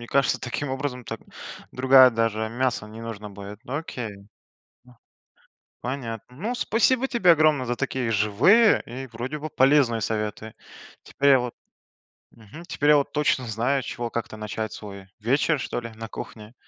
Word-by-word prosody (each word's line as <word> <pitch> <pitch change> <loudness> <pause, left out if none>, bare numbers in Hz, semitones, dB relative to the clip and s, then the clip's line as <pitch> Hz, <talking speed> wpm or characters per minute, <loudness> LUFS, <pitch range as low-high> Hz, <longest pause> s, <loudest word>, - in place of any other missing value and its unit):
мне 120 - -8
кажется, 140 +2 +1
таким 130 +3 -3
образом 130 -2 -4
так 115 - -6 0.5
другая 130 0 +7
даже 110 -1 0
мясо 120 -2 -1
не 110 +1 -10
нужно 110 -2 -7
будет. 100 +2 -10
Ну 135 +2 -4
окей. 110 -10 -6 1.6
Понятно. 125 -1 -5
Ну, 220 - -3
спасибо 250 +2 +2
тебе 210 -9 +3
огромное 155 -4 +3
за 120 - 0
такие 130 -2 -2
живые 115 - +4
и 130 +3 -7
вроде 125 +6 -5
бы 155 +2 -5
полезные 130 -5 +3
советы. 110 +1 -3 0.5
Теперь 140 0 +1
я 135 - +7
вот 125 -1 -4 0.8
Мгм. 115 +9 -13
Теперь 145 +1 +1
я 150 - +8
вот 140 - +1
точно 145 -4 +1
знаю, 125 +5 0
с - - -9
чего 120 -1 -4
как-то 115 -2 -5
начать 110 0 -4
свой 100 -2 -9
вечер, 135 +7 +1
что 120 - -3
ли, 115 -1 -8
на 115 0 -6
кухне. 110 -1 -9
120 Hz, 160 wpm, -25 LUFS, 110-140 Hz, 1.6 s, я